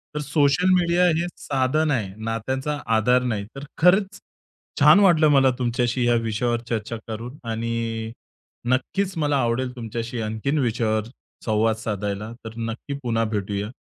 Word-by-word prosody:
तर - - -1
social 150 +4 +2
media 175 0 +3
हे 170 - 0
साधन 145 +3 0
आहे, 105 -8 -1
नात्याचा 130 +6 -2 0.2
आधार 125 +3 +3
नाही. 110 -5 -2
तर 140 +1 -7
खरंच 190 +4 +3 0.6
छान - - +7
वाटलं 170 -6 +5
मला 135 -2 +5
तुमच्याशी 120 0 0
या 120 - +4
विषयावर 115 +2 -1
चर्चा 115 0 -3
करून 115 +5 -6
आणि 115 0 -3 0.6
नक्कीच 190 +10 0
मला 145 -2 +1
आवडेल 125 +2 -1
तुमच्याशी 115 0 -4
आणखीन 110 +7 -2
विषयावर 110 -3 0 0.4
संवाद 110 0 +2
साधायला. 105 -1 -4
तर 110 - -7
नक्की 115 +4 -4
पुन्हा 115 -2 0
भेटूया. 100 +1 -2
120 Hz, 140 wpm, -23 LUFS, 110-140 Hz, 0.6 s, छान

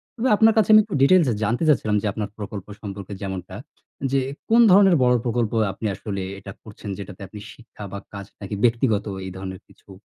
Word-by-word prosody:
তবে 245 +1 -1
আপনার 220 +1 +5
কাছে 215 -2 +3
আমি 215 - +9
একটু 205 -5 -5
ডিটেইলস 170 +3 +5
এ - - 0
জানতে 115 +8 0
চাচ্ছিলাম। 110 -8 +2
যে 105 - -2
আপনার 105 -2 -4
প্রকল্প 100 -2 -7
সম্পর্কে 100 -1 -7
যেমনটা, 95 -2 -6 0.6
যে 135 - +3 0.3
কোন 230 +2 +6
ধরনের 195 -1 +6
বড় 125 0 +4
প্রকল্প 120 -2 0 0.2
আপনি 110 - -8
আসলে 100 0 -5 0.2
এটা 100 0 -9
করছেন? 105 -1 -10
যেটাতে 100 0 -9
আপনি 105 +3 -10
শিক্ষা, 115 -3 -13
বা 100 - -5
কাজ 100 -1 -7 0.2
নাকি, 100 +1 -5
ব্যক্তিগত 115 -3 +2 0.2
এই 95 - -6
ধরনের 95 -1 -7
কিছু? - - -24
105 Hz, 195 wpm, -23 LUFS, 100-135 Hz, 0.6 s, আমি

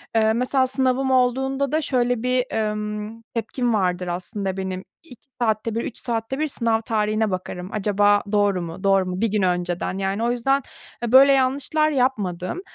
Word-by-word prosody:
Eee, 220 0 +4
mesela 255 +2 +1
sınavım 265 0 +1
olduğunda 265 +2 +1
da 310 +1 +1
şöyle 245 -4 0
bir, 250 0 +1
emm, 210 0 -3
tepkim 235 +1 -1
vardır 180 -3 0
aslında 190 +2 -3
benim, 190 -1 -4 0.2
2 260 -3 -16
saatte 220 -1 0
bir, 230 - -1
3 - - -6
saatte 235 +2 -3
bir 310 - +1
sınav 230 -5 0
tarihine 215 -2 0
bakarım 180 0 -5
acaba 205 0 +2
doğru 205 -3 +2
mu 170 +3 -7
doğru 195 -1 +3
mu 180 +2 -4
bir 230 - +3
gün 210 - +1
önceden. 180 0 -1
Yani, 195 +3 -1
o 240 - +2
yüzden, 270 +3 +1 0.4
eee, 235 - -1
böyle 270 +2 +8
yanlışlar 275 +3 +2
yapmadım. 220 - -1
225 Hz, 170 wpm, -23 LUFS, 195-255 Hz, 0.4 s, böyle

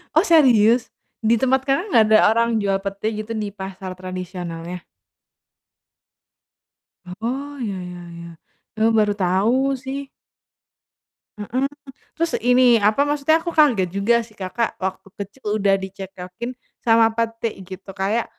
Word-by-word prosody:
Oh, - - +6
serius? 245 -7 +5 0.3
Di 225 +1 +3
tempat 265 +2 +2
Kakak 275 +7 +1
enggak 225 -6 +6
ada 215 - +7 0.2
orang 230 +1 +2
jual 195 -1 +1
pete 200 +2 -3
gitu 215 +1 -6
di 210 -1 -3
pasar 190 -1 -7
tradisionalnya? 180 -2 -6 2.4
Oh, 275 +5 -4
ya 210 -5 -3 0.2
ya 175 0 -9 0.2
ya. 170 - -9 0.5
Eee, 220 +1 +3
baru 210 -1 +3
tahu 215 +9 +2
sih. 270 +2 -6 1.3
Mhm. 255 +6 -2 0.5
Terus 335 0 0
ini, 245 -2 +5
apa 215 +8 +3
maksudnya 295 +2 +2
aku 335 +1 -5
kaget 245 - +4
juga 230 +4 +2
sih 220 - -20
Kakak 210 +3 -2
waktu 190 +1 -4
kecil 205 +5 -10 0.2
udah 195 -1 +4
dicekokin 190 +3 -7 0.3
sama 225 -1 +4
pete 230 0 -2
gitu, 190 +1 -10
kayak 205 +4 0
220 Hz, 130 wpm, -21 LUFS, 195-250 Hz, 2.4 s, ada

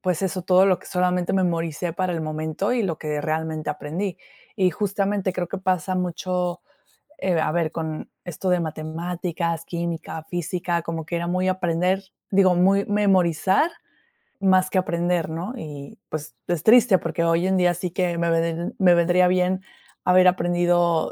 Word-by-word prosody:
pues 180 -2 -1
eso, 185 -1 -2
todo 185 +2 +5
lo 185 -2 +3
que - - -16
solamente 180 -1 0
memoricé 170 -2 -1
para 185 +1 -1
el 165 - -2
momento, 155 +6 -2
y 245 -2 +1
lo 170 -6 -2
que 150 -1 -3
realmente 155 0 -2
aprendí. 160 +6 -4 0.4
Y 185 -1 +3
justamente, 200 +1 -1
creo 180 -1 -3
que - - -4
pasa 185 -1 0
mucho, 180 0 -2 0.6
eh, 185 -3 0
a - - 0
ver, 165 -1 0
con 160 -1 -5
esto 180 +2 -3
de 180 -1 +3
matemáticas, 165 +1 -3
química, 170 -2 -4
física, 175 0 -2
como 165 -1 -4
que 170 +3 -4
era 170 0 -2
muy 185 +1 0
aprender 185 +1 0 0.3
digo, 190 -2 +5
muy 195 +3 +3
memorizar 195 - +2 0.7
más 185 -1 +3
que 190 - +3
aprender, 175 -1 0
¿no? 170 +8 -4
Y, 145 - -9
pues, 150 -6 -6
es 170 -3 -1
triste, 225 -3 +6
porque 165 0 -2
hoy 165 +1 +2
en 190 0 +2
día 175 -1 +3
sí 175 +1 -4
que 175 -1 -1
me 170 0 +1
ven 165 +1 -1
me 180 -3 +6
vendría 175 +1 +4
bien 185 +1 +1 0.4
haber 185 0 +5
aprendido 175 -2 +2
175 Hz, 170 wpm, -23 LUFS, 165-185 Hz, 0.7 s, triste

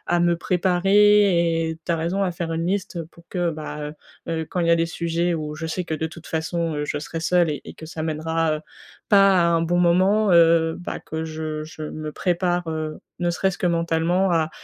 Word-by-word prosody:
à - - +2
me 170 0 +3
préparer 180 -2 +3
et 160 - -5
tu - - -1
as 165 - +1
raison, 175 +5 -1
à 185 - 0
faire 170 -1 -4
une 165 +1 -2
liste 185 -2 -2
pour 170 - -19
que, 175 -2 -1
bah 155 -1 -6
heu 150 - -9 0.3
heu, 160 -1 -2
quand 185 - -2
il 170 - +1
y - - +4
a - - +6
les 165 0 +1
sujets 170 +1 -1
où 150 -1 -4
je 160 +1 -5
sais 180 +3 -2
que, 160 - -4
de 160 +1 -2
toute 165 0 -13
façon, 165 0 -2
heu, 150 - -2
je 145 - -2
serai 160 +2 -5
seule 170 0 +2
et 145 - -5
et - - -9
que 160 - -10
ça 160 0 -6
mènera, 160 0 0
heu, 155 - -4 0.5
pas 195 -1 +6
à 170 - +4
un 165 -1 +2
bon 170 +1 +1
moment, 185 +4 +3
heu, 165 -1 +5
bah, 175 - -5
que 160 0 -5
je 155 -1 -4
je 155 0 -11
me 155 0 -5
prépare, 175 -1 0
heu, 155 -1 -4 0.2
ne 175 0 +1
serait-ce 180 +1 0
que 180 - 0
mentalement 170 +2 +1
à 160 -2 +1
170 Hz, 235 wpm, -23 LUFS, 160-175 Hz, 0.5 s, a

